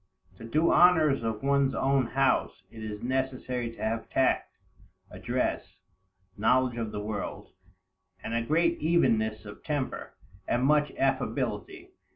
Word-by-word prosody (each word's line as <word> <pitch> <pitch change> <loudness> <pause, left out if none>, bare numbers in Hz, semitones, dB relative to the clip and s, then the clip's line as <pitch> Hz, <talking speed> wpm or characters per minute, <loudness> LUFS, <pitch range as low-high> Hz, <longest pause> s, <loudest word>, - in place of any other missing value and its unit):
To - - -12
do 150 +8 0
the 170 - +4
honors 160 -6 +5
of 110 0 -3
one's 140 -1 +2
own 135 -2 +2
house, 135 -7 0
it 110 -1 -9
is 105 -1 -6
necessary 130 -1 -2
to 115 - -9
have 110 +1 -2
tact, 130 - 0 0.5
address, - - -3 0.6
knowledge 125 +3 +2
of 115 -2 -3
the - - -4
world, 105 -1 -5 0.7
and - - -4
a 115 - +1
great 170 +7 +1
evenness 110 -10 +1
of 105 - -11
temper, 145 -4 -4 0.3
and 120 - +1
much 150 +1 +3
affability. 135 0 -2
130 Hz, 140 wpm, -28 LUFS, 115-140 Hz, 0.7 s, honors